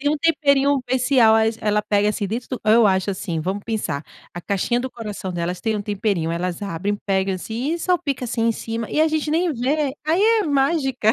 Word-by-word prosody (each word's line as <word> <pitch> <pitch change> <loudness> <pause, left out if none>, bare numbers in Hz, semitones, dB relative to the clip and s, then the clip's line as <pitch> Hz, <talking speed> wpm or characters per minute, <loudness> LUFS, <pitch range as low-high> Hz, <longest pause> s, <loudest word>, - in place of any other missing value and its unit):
Tem 290 +1 +1
um 305 - +1
temperinho 285 -3 +2
especial, 250 -2 +4 0.3
elas 210 -1 +1
pega 205 0 +3
assim, 210 -1 -1
dentro 235 +5 -4
do 255 - -4
eu 220 +1 +5
acho 190 0 +1
assim, 185 -4 -3
vamos 190 +5 -3
pensar, 210 -10 -3 0.3
a 175 - -6
caixinha 200 +6 0
do 260 +1 -4
coração 210 -5 -6
delas 175 +1 -3
tem 220 -1 -1
um 205 - -3
temperinho. 200 -5 -1
Elas 175 +2 -3
abrem, 200 +2 -2
pegam 190 -1 +1
assim, 230 - -3
e 340 - -4
salpica 325 -7 -1
assim 230 -1 -2
em - - +3
cima, 225 0 -5
e - - +1
a 315 - +4
gente 310 -1 -1
nem 335 +2 +1
vê. 275 +2 -1
Aí 335 +5 +2 0.2
é - - -1
mágica. 275 -6 +1
225 Hz, 210 wpm, -21 LUFS, 200-280 Hz, 0.3 s, eu